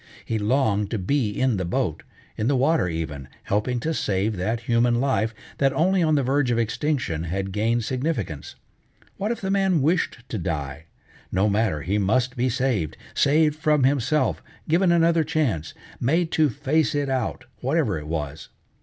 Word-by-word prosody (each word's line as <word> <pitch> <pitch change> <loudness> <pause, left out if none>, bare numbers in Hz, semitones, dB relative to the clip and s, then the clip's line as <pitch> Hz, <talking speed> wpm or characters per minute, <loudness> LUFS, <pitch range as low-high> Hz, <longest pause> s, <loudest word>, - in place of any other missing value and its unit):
He 110 - -1
longed 105 -3 +1
to 115 - -2
be 110 +5 0
in 125 +1 0
the 95 - -1
boat, 85 - -1 0.3
in 110 - -1
the 140 - +3
water 140 - +2
even, 80 -5 -4 0.2
helping 115 +5 0
to 160 +4 -1
save 105 -4 0
that 110 +6 -2
human 120 0 +2
life 115 -5 +1 0.3
that 135 -1 +3
only 180 +6 +2
on 155 -2 +3
the 140 - +2
verge 135 0 +1
of 120 - +1
extinction 115 - -1
had 95 +3 -3
gained 115 +4 0
significance. 125 - -3 0.6
What 205 - -2
if 235 - -4
the 190 -1 -1
man 195 -4 +2
wished 160 -6 0
to 110 - -3
die? 75 -3 -4 0.5
No 95 +3 +2
matter, 100 -8 0
he 100 +4 0
must 125 +6 +1
be 125 +1 +1
saved, 120 - -1 0.2
saved 150 +1 +3
from 155 -3 +2
himself, 140 +3 +1 0.3
given 175 +3 +3
another 165 -1 +4
chance, 145 - -1 0.2
made 165 +6 +1
to 155 -2 +3
face 145 +5 0
it 145 -1 0
out, 130 -1 -2
whatever 130 - 0
it 75 - -9
was. 75 -2 -4
125 Hz, 170 wpm, -24 LUFS, 100-150 Hz, 0.6 s, another